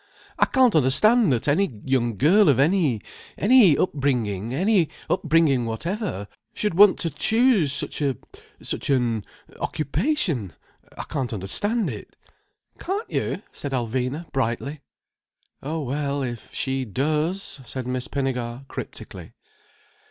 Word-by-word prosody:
"I - - +6
can't 255 -4 +4
understand 185 - +4
that 120 +1 0
any 145 - +1
young 120 -5 0
girl 175 - +5
of 135 -3 +3
any—any 175 - +3
upbringing, 120 - -1
any 185 - +2 0.2
upbringing 150 -6 +2
whatever, 165 - -3 0.3
should 210 -4 -1
want 200 +3 +7
to 165 - -1
choose 220 - +3
such 140 - -3
a—such 140 0 -5
an—occupation. 130 - -1 0.4
I - - -4
can't 135 -5 -3
understand 205 - -1
it." - - -10 0.6
"Can't 400 +5 -4
you?" - - -2
said 140 -2 -6
Alvina 130 +5 -2
brightly. 135 +3 -2 0.8
"Oh 155 +3 -3
well, 140 +1 -2
if 120 -3 -6
she 135 0 -2
does—" 150 - -2
said 130 0 -6
Miss 125 0 -3
Pinnegar 130 -2 -3
cryptically. - - -8
140 Hz, 115 wpm, -24 LUFS, 125-185 Hz, 0.8 s, want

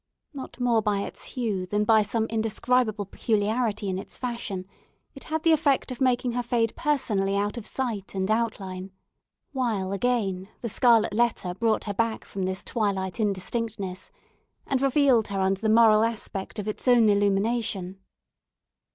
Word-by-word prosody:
Not 265 -2 -8
more 240 -2 +2
by 205 -2 0
its - - -5
hue 210 -7 -2
than 210 +3 0
by 220 0 +5
some 220 +2 0
indescribable 225 0 0
peculiarity 215 +1 -1
in 190 -1 -2
its 195 - -8
fashion, 235 -7 -4 0.5
it 275 - -11
had 315 0 -2
the 330 - +5
effect 290 -4 +2
of 255 - -7
making 250 -1 +2
her 245 +1 -1
fade 235 -2 0
personally 215 -11 0
out 205 +1 -1
of 235 -3 -5
sight 225 -8 -3
and 190 +2 0
outline; 195 -5 -2 0.6
while 225 -9 -1
again 200 -4 -1
the 235 - -3
scarlet 230 -1 +4
letter 220 -5 +1
brought 225 +3 0
her 205 - -3
back 230 +2 -1
from 195 -2 -4
this 190 0 -2
twilight 195 -3 -2
indistinctness, 200 -1 -2 0.6
and 265 -1 0
revealed 270 -4 +3
her 200 -1 -3
under 190 0 +1
the 220 - +1
moral 220 -1 +6
aspect 215 -4 -3
of 210 0 -4
its 215 - -5
own 240 -3 +6
illumination. 200 -1 0
220 Hz, 160 wpm, -26 LUFS, 195-240 Hz, 0.6 s, moral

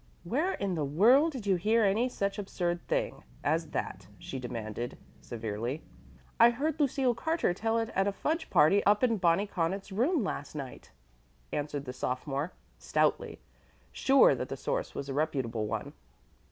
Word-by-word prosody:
"Where 290 - 0
in 195 -2 -2
the 160 -3 -1
world 235 - +5
did 255 -8 -7
you 195 -2 +3
hear 220 +5 +3
any 215 +5 +2
such 200 -3 -2
absurd 175 -3 -2
thing - - -1 0.2
as 160 +2 0
that?" 95 -1 -4
she 130 +8 -6
demanded 120 -1 -5 0.2
severely. 115 +5 -4 0.6
"I 235 - +9
heard 290 +6 -2
Lucille 270 -3 +2
Carter 320 - 0
tell 225 +4 0
it 225 0 -1
at 195 -2 +1
a - - +2
fudge 320 - -2
party 195 +7 +5
up 205 +3 +3
in 230 -3 +3
Bonnie 180 +1 +3
Connaught's 195 +1 -2
room 255 - +1
last 145 -6 -4
night," 135 -4 -7 0.6
answered 145 -1 -3
the 125 - -5
sophomore, 135 +5 -3 0.3
stoutly, - - 0 0.5
sure 270 0 +5
that - - -4
the - - -4
source - - -3
was 140 - -4
a 135 - -3
reputable 130 -7 -1
one. - - -4
190 Hz, 165 wpm, -30 LUFS, 140-235 Hz, 0.6 s, I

